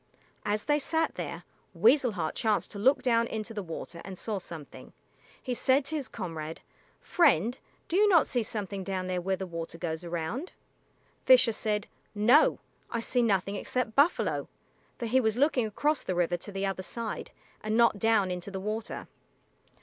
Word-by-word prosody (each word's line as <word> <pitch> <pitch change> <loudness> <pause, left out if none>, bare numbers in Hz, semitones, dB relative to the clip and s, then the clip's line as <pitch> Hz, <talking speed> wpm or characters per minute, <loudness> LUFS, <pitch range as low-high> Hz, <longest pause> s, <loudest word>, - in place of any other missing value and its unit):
As 210 +1 0
they 295 0 +2
sat 320 +3 0
there, - - -5 0.3
Weasel 275 - +4
Heart 160 -5 -2
chanced 215 -2 0
to 200 - -7
look 265 +7 +3
down 230 -2 +3
into 220 0 -5
the 210 - -3
water 170 -1 -7
and 190 -2 -8
saw 210 0 -3
something. 165 -5 -10 0.5
He 255 - -3
said 260 +3 +2
to 315 - -3
his 285 -4 -3
comrade, 165 -6 -6 0.4
"Friend, 240 - +3 0.3
do 335 - -2
you 415 +2 +5
not 335 -6 +6
see 245 - 0
something 200 -3 -4
down 185 -1 -3
there 180 -1 -2
where 190 +2 0
the 190 - -5
water 165 -1 -6
goes 165 -1 -3
around?" 175 - -4 0.7
Fisher 255 -2 +7
said, 210 -1 -1 0.3
"No; 235 +9 +5 0.3
I 230 - -2
see 245 +2 +1
nothing 200 -3 +1
except 250 -3 -2
buffalo," 285 +8 +2 0.5
for 240 - -4
he 255 +3 +3
was 220 -1 +1
looking 260 -4 +2
across 295 +8 0
the 185 - -3
river 175 0 +1
to 205 - -9
the 195 0 -2
other 195 -1 -2
side, 230 +3 -5 0.3
and 215 +1 -1
not 235 -3 +4
down 220 -4 +3
into 180 +2 -5
the 195 -1 -5
water. 215 +3 -4
215 Hz, 180 wpm, -29 LUFS, 185-250 Hz, 0.7 s, Fisher